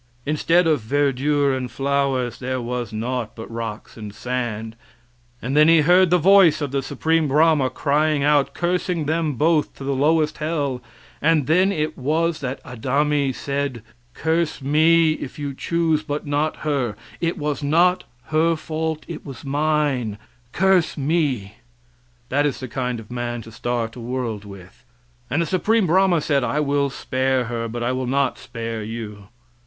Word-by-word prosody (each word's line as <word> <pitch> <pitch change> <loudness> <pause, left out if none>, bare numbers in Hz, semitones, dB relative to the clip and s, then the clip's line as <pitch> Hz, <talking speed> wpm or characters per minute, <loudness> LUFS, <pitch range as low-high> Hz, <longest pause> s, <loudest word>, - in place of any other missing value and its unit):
Instead 165 +4 +2
of 155 -5 +2
verdure 140 +3 +1
and 125 -1 -4
flowers 135 -2 -1
there 130 0 -2
was 120 -1 -4
naught 115 +1 -3
but 110 - -7
rocks 115 -2 -6
and 105 -2 -8
sand, 115 -2 -3 0.7
and 130 +4 -2
then 150 +1 +6
he 165 -1 +6
heard 180 +3 +5
the 180 - +4
voice 180 -3 +6
of 145 -3 -3
the 140 0 0
Supreme 155 +4 0
Brahma 150 -1 +3
crying 150 +2 +1
out 145 -1 +2
cursing 175 -2 -1
them 160 0 0
both 155 +3 +1
to - - -9
the 140 +1 -1
lowest 150 +2 +1
hell, 145 -5 -2 0.4
and 155 -2 +3
then 185 +6 +3
it 155 -6 -2
was 160 +4 0
that 130 0 -5
Adami 140 +3 0
said: 140 -3 -3 0.3
"Curse 160 +1 0
me, 160 +3 +4
if 140 - -7
you 145 -2 -4
choose, 160 +1 0
but 150 -1 -4
not 145 +2 0
her; 135 -8 0 0.2
it 170 +2 -1
was 150 -2 -2
not 170 +5 +3 0.3
her 165 +2 +3
fault, 160 0 -3
it 170 - -7
was 135 -3 -10
mine; 140 -6 0 0.3
curse 190 -1 +2
me." 135 - -1 0.7
That 145 +2 +2
is 140 - -3
the 130 - -6
kind 125 -1 -3
of 110 +1 -12
a - - -5
man 120 -1 -3
to 115 - -12
start 115 0 -3
a - - -9
world 120 -3 -4
with. 100 +3 -13 0.5
And 165 +3 +1
the - - -2
Supreme 205 +6 +2
Brahma 180 -1 +3
said 140 -3 +1
"I 125 +5 0
will 140 -1 +1
spare 130 -1 0
her, 115 0 -3
but 120 +1 -4
I 120 - 0
will 130 0 -2
not 135 0 0
spare 115 -1 -5
you." 105 -2 -7
140 Hz, 170 wpm, -22 LUFS, 125-155 Hz, 0.7 s, then